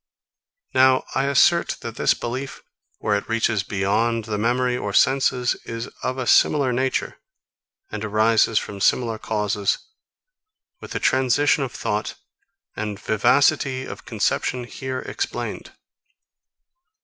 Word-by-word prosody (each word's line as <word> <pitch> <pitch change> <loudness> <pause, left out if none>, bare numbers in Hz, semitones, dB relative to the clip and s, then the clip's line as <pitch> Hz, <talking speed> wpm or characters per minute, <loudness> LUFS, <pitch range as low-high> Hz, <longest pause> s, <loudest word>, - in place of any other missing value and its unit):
Now 130 0 +4
I 135 - +1
assert, 155 +5 +3
that - - -6
this - - +2
belief, 130 +3 -5 0.3
where 105 - 0
it 100 - -4
reaches 115 -2 +1
beyond 105 +4 0
the 105 -2 -3
memory 125 +3 +1
or 105 -5 -4
senses, 130 -1 +3
is 115 +1 -6
of 130 - -2
a 130 - -3
similar 135 0 +4
nature, 130 +2 -1 0.7
and - - -5
arises 110 +1 +2
from 100 -1 -3
similar 115 0 +1
causes, 105 -2 -1 1.0
with - - -9
the - - -2
transition 135 +3 +2
of 130 - -4
thought 105 -2 -3 0.6
and 105 -2 -4
vivacity 130 +3 +2
of - - -9
conception 125 -1 -1
here 130 +1 -5
explained. 395 - -5
120 Hz, 125 wpm, -22 LUFS, 110-130 Hz, 1.0 s, Now